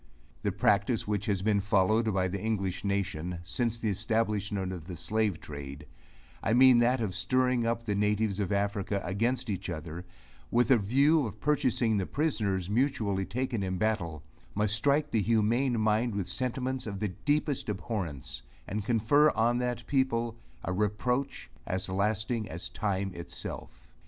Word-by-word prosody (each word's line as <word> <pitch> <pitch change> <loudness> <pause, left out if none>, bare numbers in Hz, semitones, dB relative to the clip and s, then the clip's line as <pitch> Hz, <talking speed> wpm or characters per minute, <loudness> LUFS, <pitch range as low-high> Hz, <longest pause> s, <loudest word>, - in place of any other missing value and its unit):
The - - 0
practice 105 +3 +2
which 105 -1 -1
has 100 -3 0
been 105 -1 +3
followed 110 +2 +2
by 95 -2 +1
the 95 +1 -4
English 100 -5 -2
nation, 95 -4 -2
since 115 +8 -1
the 115 -2 -1
establishment 105 -2 -1
of 85 -3 -8
the 90 - -6
slave 110 -1 0
trade 70 0 -8 0.6
I 110 - +1
mean 130 -1 +7
that 120 +1 +3
of 105 -5 -1
stirring 125 +3 +1
up 115 0 -1
the 105 -3 -1
natives 105 0 +1
of 100 -2 -1
Africa, 100 0 0
against 120 +7 0
each 95 -3 -3
other, 85 +1 -5 0.5
with 120 +3 +2
a 130 - +7
view 140 +7 +3
of 105 0 -9
purchasing 130 -6 +2
the 95 - -1
prisoners 105 - 0
mutually 105 -5 0
taken 120 +1 -2
in 95 -1 -2
battle, 90 -7 -1 0.3
must 105 0 +1
strike 145 +6 +2
the 110 - +2
humane 115 +3 +2
mind 110 +1 +1
with 100 -3 -2
sentiments 130 +4 -2
of 100 -2 -4
the 105 0 -1
deepest 145 - -1
abhorrence, 85 - -4 0.3
and 105 +2 -3
confer 120 +7 +4
on 120 -1 +2
that 125 -1 -2
people 120 -4 0 0.3
a 90 - -2
reproach, 115 +7 -1 0.2
as 95 +1 -2
lasting 110 +3 -1
as 85 +2 -5
time 100 -2 -2
itself. 85 0 -7
105 Hz, 160 wpm, -29 LUFS, 95-120 Hz, 0.6 s, mean